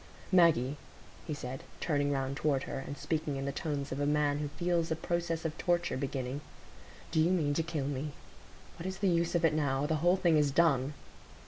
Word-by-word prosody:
"Maggie," 155 -7 +4 0.5
he 155 - -2
said, 130 -1 -6 0.2
turning 145 -3 +1
round 135 -1 -1
toward 140 -2 +1
her, - - -4
and 140 +1 -6
speaking 155 -3 -2
in 135 0 -3
the 140 - -1
tones 140 -1 -3
of 130 - -3
a 145 - +1
man 145 -1 +2
who 150 - -2
feels 170 +2 0
a 160 - +1
process 170 0 -2
of 160 -1 -2
torture 175 0 +1
beginning, 130 0 -3 0.7
"do 160 - +2
you 160 +2 +4
mean 155 -6 +2
to 165 - +1
kill 160 -4 -2
me? 145 +1 -3 0.7
What 170 - -4
is 190 0 -4
the 200 - +1
use 170 0 +1
of 170 -1 +3
it 155 - +4
now? 140 -2 +1
The 155 +1 +1
whole 175 +2 +4
thing 170 -4 +4
is 150 -1 +3
done." 145 -2 +3
150 Hz, 210 wpm, -32 LUFS, 140-170 Hz, 0.7 s, Maggie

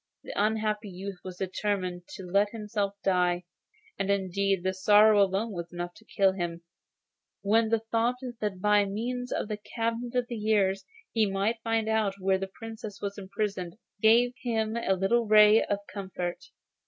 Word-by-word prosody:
The - - -7
unhappy 215 0 0
youth 190 0 -7
had 185 -1 -7
determined 185 -2 -2
to 190 - -8
let 200 +3 +2
himself 210 -2 -3
die, 180 -2 +2 0.6
and 195 0 -1
indeed 195 -1 0
his 190 0 -2
sorrow 210 0 +7
alone 200 +4 +1
was 170 -3 -6
enough 175 0 -5
to 220 - -18
kill 195 -2 +3
him, 170 -3 -4 0.8
when 220 +2 +3
the 225 -1 +2
thought 235 +2 +2 0.2
that 205 -3 -2
by 210 +1 +4
means 245 +5 -3
of - - -1
the 210 -1 -3
cabinets 230 +3 -3
of 250 -1 +2
the 240 -2 -5
years 205 -3 +1 0.3
he 220 -3 +2
might 205 +4 -1
find 225 -1 0
out 220 -3 +1
where 190 0 +1
the 195 - -3
Princess 220 -1 -8
was 200 0 -4
imprisoned, 195 -2 -4 0.2
gave 235 +3 +5
him 220 -2 -1
a 235 -4 +1
little 220 +5 +1
ray 210 +1 +7
of 205 - -1
comfort. 185 -4 -5
205 Hz, 165 wpm, -28 LUFS, 190-220 Hz, 0.8 s, sorrow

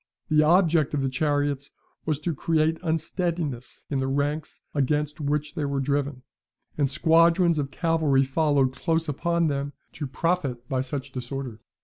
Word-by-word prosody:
The 155 -1 +5
object 165 -2 +3
of 140 - 0
the 135 - +1
chariots 145 0 0 0.4
was 155 -2 +1
to 165 +2 -1
create 160 +2 +1
unsteadiness 165 -5 -2
in 135 - +1
the 135 - 0
ranks 145 +3 -2
against 150 +2 0
which 150 +1 -1
they 150 - -3
were 140 -1 -1
driven, 140 -1 -1 0.5
and 140 -3 +1
squadrons 165 +2 +4
of 140 -2 -2
cavalry 160 -4 +2
followed 135 -1 +2
close 165 +3 0
upon 170 +3 0
them, 140 -1 -1 0.2
to 145 - -4
profit 135 -4 -1
by 130 -1 0
such 135 +1 -5
disorder. 130 -2 -5
145 Hz, 150 wpm, -26 LUFS, 135-160 Hz, 0.5 s, The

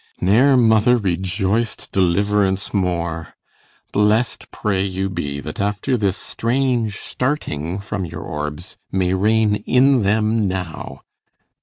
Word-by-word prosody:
Ne'er 125 +9 +4
mother 115 +1 +4
Rejoic'd 95 +3 -1
deliverance 95 +1 +1
more. 85 -4 -2 0.6
Blest 105 +3 +1
pray 100 -3 -1
you 95 0 -2
be, 70 -5 -3
That, 75 +5 -6
after 100 +6 0
this 100 -4 0
strange 120 -3 -1
starting 90 - -3
from 100 -1 -4
your 85 - -7
orbs, 75 +4 -6
You - - -2
may 90 -1 +1
reign 105 +2 +2
in 130 0 +4
them 110 +1 +1
now! 90 -7 -5
100 Hz, 120 wpm, -20 LUFS, 90-110 Hz, 0.6 s, Ne'er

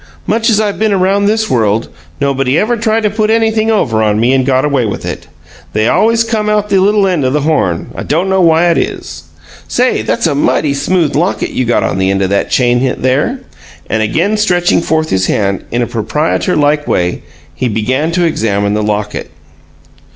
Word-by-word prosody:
"Much 225 +2 +1
as 215 -2 +3
I 210 -1 +1
been 215 +1 -1
around 195 +2 +1
this 220 +1 +1
world, 110 - 0 0.3
nobody 135 0 0
ever 230 +6 +1
tried 225 -1 0
to 210 - +2
put 215 0 0
anything 220 0 +1
over 120 - +1
on 105 -1 +1
me 120 +3 +2
and 135 -1 +2
got 130 +1 +1
away 140 -4 +1
with 105 -3 -4
it. - - -6 0.5
They 110 +1 +1
always 230 - +2
come 220 -2 -1
out 210 0 0
the 195 -1 +3
little 205 +1 +3
end 180 -6 0
o' 130 - +1
the 145 +3 0
horn; 140 - -1
I - - -6
dunno 185 +5 0
why 170 0 +4
it - - +1
is. - - -5 0.4
Say, 250 +1 +1
that's 235 - -1
a 160 - +1
mighty 145 0 +1
smooth 155 +3 0
locket 175 +6 -1
you 130 - -1
got 120 - +1
on 95 - -1
the 95 0 +1
end 100 0 0
o' - - +1
that 100 +1 -1
chain, 120 -1 +2 0.2
there." 145 - 0 0.5
And 110 - +1
again 170 - 0
stretching 180 -5 +2
forth 160 -1 -1
his 95 -1 +1
hand, 100 -2 -1
in 120 +1 -1
a - - 0
proprietor 150 - -1
like 150 0 +1
way, 90 0 -1 0.3
he 125 - -2
began 130 +8 -1
to 175 0 +1
examine 100 -9 0
the 105 - 0
locket. 105 0 -3
150 Hz, 200 wpm, -13 LUFS, -, 0.5 s, why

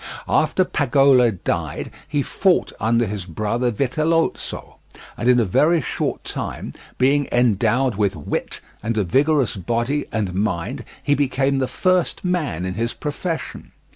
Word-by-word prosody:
After 185 - +2
Pagolo 135 -4 +4
died, 95 -6 -3 0.2
he 145 -1 0
fought 190 +4 +1
under 115 +2 +2
his 100 -3 -4
brother 110 +8 -1
Vitellozzo, 155 +8 -1 0.4
and 120 - 0
in 125 -1 +5
a 115 - +2
very 160 - +3
short 135 - -3
time, - - -5 0.2
being 140 +2 +3
endowed 120 +2 +2
with 100 -1 0
wit 75 - -4 0.2
and 115 0 -2
a 105 - +3
vigorous 135 - +2
body 120 - -1
and 105 -5 -2
mind, 90 -3 -2 0.2
he 145 - +2
became 135 -1 +1
the 130 - 0
first 185 +3 0
man 150 - -1
in 95 - -3
his 115 +4 -2
profession. 160 +3 -5
125 Hz, 140 wpm, -21 LUFS, 105-145 Hz, 0.4 s, in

